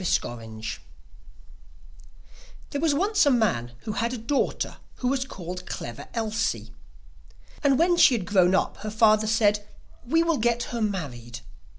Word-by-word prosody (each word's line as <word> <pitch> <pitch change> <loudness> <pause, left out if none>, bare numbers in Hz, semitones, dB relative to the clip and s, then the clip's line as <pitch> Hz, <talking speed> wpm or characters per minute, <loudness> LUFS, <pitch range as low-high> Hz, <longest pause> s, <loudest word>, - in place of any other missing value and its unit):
CLEVER 120 -8 -1
ELSIE 110 -1 -6 1.9
There 285 - -2
was 315 -3 +2
once 405 +6 +3
a - - +7
man 190 - +1
who 215 - -4
had 235 +3 -1
a - - -5
daughter 235 +5 -1 0.2
who 250 - -1
was 265 -1 0
called 180 -5 -7
Clever 120 +4 -6
Elsie. 215 - -2 0.9
And 275 -2 +4
when 345 +3 +3
she 265 - +7
had 205 -6 -3
grown 185 -1 +4
up - - 0
her 215 - -5
father 215 0 +4
said: 210 -2 +2 0.4
'We 325 +6 +3
will 335 -2 +1
get 235 +1 +1
her 235 - -2
married. 140 - -4
215 Hz, 155 wpm, -26 LUFS, 175-255 Hz, 1.9 s, a